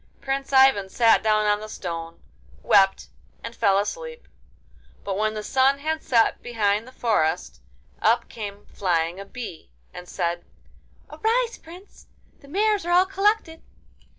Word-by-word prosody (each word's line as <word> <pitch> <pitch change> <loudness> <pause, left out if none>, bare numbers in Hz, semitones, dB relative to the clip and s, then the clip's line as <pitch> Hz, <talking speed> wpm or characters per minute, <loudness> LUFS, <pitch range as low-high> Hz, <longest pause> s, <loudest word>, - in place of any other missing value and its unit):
Prince 270 0 -3
Ivan 265 -8 +5
sat 230 +2 +4
down 215 -1 +2
on 210 0 +2
the 215 0 -9
stone, 165 -4 -7 0.4
wept, 195 -1 +3 0.3
and 230 +1 -7
fell 200 -4 +3
asleep. 475 - -4 0.8
But 195 - -3
when 215 +2 -1
the 215 - -5
sun 270 +4 +2
had 315 +2 -3
set 230 -3 +2
behind 215 -2 -1
the - - -12
forest, 160 - -1 0.4
up 230 +3 +2
came 205 -2 -8
flying 175 -1 -1
a 200 - -7
bee, 220 - -9 0.2
and 180 0 -10
said: 170 0 -2 0.7
'Arise, 470 +2 0
Prince! 355 +5 -15 0.3
The 280 - -18
mares 415 +5 +1
are 345 - -3
all 360 +2 +5
collected. 390 -3 0
225 Hz, 145 wpm, -24 LUFS, 200-320 Hz, 0.8 s, Ivan